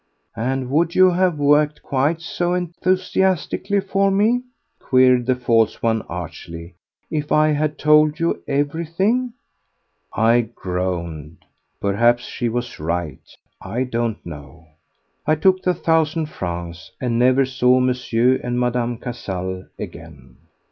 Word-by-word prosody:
"And 130 +2 -2
would 165 +3 +1
you 185 0 +6
have 180 -2 +1
worked 150 +1 +2
quite 145 +5 0
so 175 +1 -1
enthusiastically 185 +2 0
for 195 0 +1
me," 215 +5 +2 0.4
queried 125 -1 +3
the 130 - +3
false 115 -3 +1
one 110 -1 +2
archly, 85 0 -7 0.4
"if 150 -1 -3
I 155 0 +4
had 150 0 0
told 150 0 +4
you 165 0 0
everything?" 170 - 0 0.8
I 115 +1 +2
groaned. 85 -4 -4 0.3
Perhaps 120 +4 +2
she 120 - -3
was 120 +1 -4
right. 80 -2 -4 0.3
I 125 +3 -2
don't 115 -3 -2
know. 75 0 -11 0.6
I 155 - +4
took 185 +4 +3
the 180 -1 +1
thousand 160 -1 +1
francs 85 - -6
and 120 -2 -1
never 130 +2 +4
saw 130 -1 +3
M. 130 0 +2 0.5
and 125 0 -1
Mme. 120 -1 0
Cazalès 95 -7 -5
again. 75 -6 -10
130 Hz, 125 wpm, -21 LUFS, 105-160 Hz, 0.8 s, you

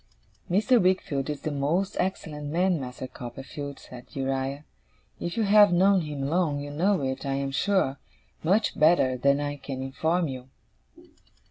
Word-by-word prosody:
'Mr. 220 +6 +4
Wickfield 155 -7 0
is 145 -2 -5
a 155 - 0
most 150 +7 0
excellent 150 -6 -3
man, 180 +1 +2
Master 125 0 -6
Copperfield,' 135 +3 -8
said 125 -1 -12
Uriah. 135 +1 -2 0.6
'If 170 - -4
you 225 - +2
have 205 -1 +6
known 190 +2 +4
him 150 -3 -5
long, 160 -2 +1
you 145 0 -6
know 180 +3 +1
it, 130 0 -3
I 135 -1 -1
am 140 0 -2
sure, 150 -2 +1 0.4
much 200 +7 +2
better 155 -5 +4
than 140 +3 +2
I 145 0 -3
can 135 -1 -6
inform 160 +6 0
you. 130 -1 -7
145 Hz, 155 wpm, -27 LUFS, 135-180 Hz, 0.6 s, have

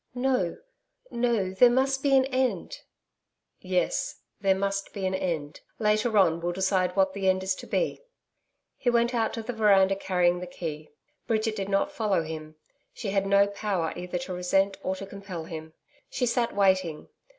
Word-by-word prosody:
'No, 250 -9 0 0.5
no. 235 -6 0
There 240 +6 +6
must 265 +2 +1
be 275 -1 +4
an 260 - +4
end.' 260 -1 -1 0.8
'Yes. - - -1 0.2
There 195 -1 +3
must 195 0 -2
be 195 -2 -3
an 185 - 0
end. 165 -6 -3 0.2
Later 215 +1 +2
on, 170 -4 +4
we'll 175 +1 -2
decide 185 -1 +1
what 190 -1 +2
the 195 -1 +1
end 185 0 +1
is 190 0 +1
to - - -9
be.' - - -1 0.8
He 245 - 0
went 235 +1 +2
out 225 -2 +1
to 225 - -4
the 245 - -4
veranda 195 -3 +4
carrying 180 -2 +1
the 180 - -6
key. 155 -3 -6 0.4
Bridget 220 -1 0
did 195 -2 -4
not 195 0 +1
follow 200 -6 0
him. 155 -1 -7 0.4
She 205 -4 -4
had 195 0 +1
no 200 0 +5
power 200 -5 -2
either 180 0 -4
to 180 +1 -5
resent 195 +2 +1
or 190 - -2
to 195 - -7
compel 195 -4 -7
him. 160 -1 -8 0.4
She 250 - -1
sat 235 0 0
waiting. 185 -6 +1
195 Hz, 175 wpm, -27 LUFS, 180-225 Hz, 0.8 s, There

